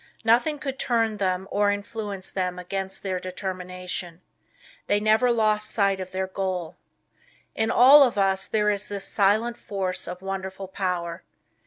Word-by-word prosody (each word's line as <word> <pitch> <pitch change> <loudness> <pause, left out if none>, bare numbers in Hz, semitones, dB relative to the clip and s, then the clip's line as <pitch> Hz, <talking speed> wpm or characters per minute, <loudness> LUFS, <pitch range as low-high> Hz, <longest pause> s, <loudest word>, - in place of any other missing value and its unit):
Nothing 245 +7 +3
could 270 -2 -5
turn 225 -3 +1
them 190 -1 -1
or 205 0 +2
influence 205 -1 -5
them 180 -1 -2
against 190 +1 -5
their 185 -2 -2
determination. 180 -1 -5 0.7
They 205 - +3
never 220 +4 +3
lost 215 -2 +1
sight 200 -3 +1
of 185 0 -6
their 190 0 -1
goal. 185 -3 -3 0.8
In 220 0 0
all 265 +5 +8
of 250 -6 +4
us 195 -1 +1
there 210 -1 +2
is 205 0 -2
this 200 -1 -4
silent 220 +4 +2
force 190 -2 -3
of 180 +1 -7
wonderful 195 0 -5
power. 180 -2 -3
195 Hz, 150 wpm, -25 LUFS, 185-215 Hz, 0.8 s, all